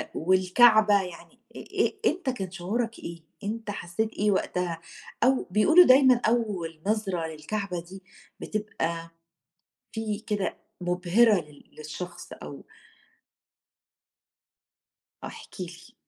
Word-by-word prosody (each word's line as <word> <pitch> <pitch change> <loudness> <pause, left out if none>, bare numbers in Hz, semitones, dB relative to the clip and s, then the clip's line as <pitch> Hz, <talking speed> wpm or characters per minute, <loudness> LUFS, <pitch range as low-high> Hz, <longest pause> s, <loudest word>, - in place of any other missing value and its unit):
والكعبة 200 +4 +5
يعني 180 -3 -10 0.2
إي - - -9
إي - - 0
أنت 340 -3 -4
كان 195 -8 -4
شعورك 220 +6 -3
إيه؟ 170 0 -7 0.2
أنت 215 +1 -4
حسّيت 205 +3 -3
إيه 210 +1 +1
وقتها؟ 180 -3 -1 0.4
أو 260 +2 +3
بيقولوا 320 - +7
دايمًا 255 -2 +6
أول 195 -9 -1
نظرة 195 -6 0
للكعبة 180 +3 -4
دي 185 +3 -12 0.4
بتبقى 170 -6 -3 0.8
في 215 -1 -3
كده 205 -3 -1 0.2
مبهرة 180 +6 +3
لل 150 -2 -17
للشخص 175 +3 -8
أو - - -10 2.6
آه - - -4
احكِ 450 - -10
لي. 180 +6 -9
200 Hz, 110 wpm, -27 LUFS, 175-225 Hz, 2.6 s, بيقولوا